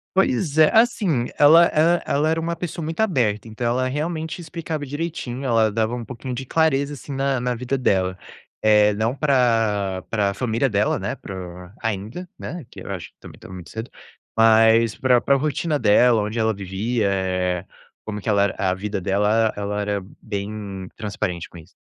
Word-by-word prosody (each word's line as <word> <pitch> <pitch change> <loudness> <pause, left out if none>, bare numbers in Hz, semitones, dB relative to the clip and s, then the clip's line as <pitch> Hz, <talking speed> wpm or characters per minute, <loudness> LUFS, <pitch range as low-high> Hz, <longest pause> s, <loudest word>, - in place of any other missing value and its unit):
Pois 155 -4 +1
é. 155 -1 +7
Assim, 195 - +2
ela 160 +4 +7
ela 170 +3 +3
ela 150 +3 +1
era 160 - +1
uma 165 +1 -2
pessoa 170 0 -5
muito 160 +4 -5
aberta, 115 - +1
então 110 +2 -5
ela 125 +2 +1
realmente 160 +4 -3
explicava 160 -2 -5
direitinho. 140 -3 -4
Ela 115 -3 +3
dava 110 +2 0
um 120 - -5
pouquinho 125 +2 -7
de 130 - -5
clareza, 145 -1 +1
assim, 140 +1 -8
na 135 -1 0
na 125 0 -1
vida 125 +3 -2
dela. 95 -6 +1 0.4
Eh, 105 -1 +5
não 110 +4 0
pra 115 - +1
pra 100 -3 +1
família 120 +3 0
dela, 105 -2 +1
né? 105 +7 -3
Pra 90 -4 -9
ainda, 110 - -4
né? 175 -5 -7
Que - - -11
eu - - -7
acho - - -5
que - - -53
também - - -12
estava 95 - -12
muito 90 -2 -9
cedo. 110 +2 -6 0.5
Mas 115 0 +5
pra 130 -3 +3
pra 140 - +3
rotina 150 +2 -1
dela, 115 +1 +4
onde 105 +3 -4
ela 110 0 +2
vivia, 100 +3 -2
eh, 90 -2 -1 0.4
como 105 -1 -5
que 105 - -11
ela 100 -2 +3
era 100 - 0
a 95 -3 +1
vida 100 +1 -3
dela, 100 +3 +1
ela 110 0 +2
ela 105 0 -3
era 100 -1 -1 0.2
bem 100 -2 -5
transparente 95 -5 -3
com - - -13
isso. 80 +1 -14
115 Hz, 185 wpm, -22 LUFS, 100-140 Hz, 0.5 s, é